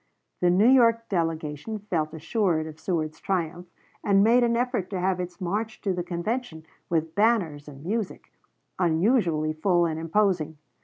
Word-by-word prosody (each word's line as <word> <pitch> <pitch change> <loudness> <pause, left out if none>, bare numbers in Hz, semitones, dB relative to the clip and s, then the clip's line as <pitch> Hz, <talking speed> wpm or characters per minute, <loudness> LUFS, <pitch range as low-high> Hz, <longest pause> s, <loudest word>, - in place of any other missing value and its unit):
The 180 - +3
New 190 +6 +4
York 230 -3 +4
delegation 165 +2 -2
felt 170 -7 -2
assured 165 0 0
of 155 0 -9
Seward's 160 -3 -2
triumph, 175 -1 -2 0.4
and 200 -1 +4
made 240 +3 +5
an 235 0 +2
effort 245 -6 -1
to 190 - -3
have 185 0 0
its 180 0 -5
march 210 +5 -3
to 195 - 0
the 180 - -2
convention, 175 0 -4 0.2
with 160 -1 0
banners 195 -10 +1
and 140 +1 -11
music, 215 +1 -3 0.5
unusually 170 -3 +2
full 175 +2 +2
and 160 -1 -2
imposing. 165 -2 0
180 Hz, 155 wpm, -26 LUFS, 160-215 Hz, 0.5 s, made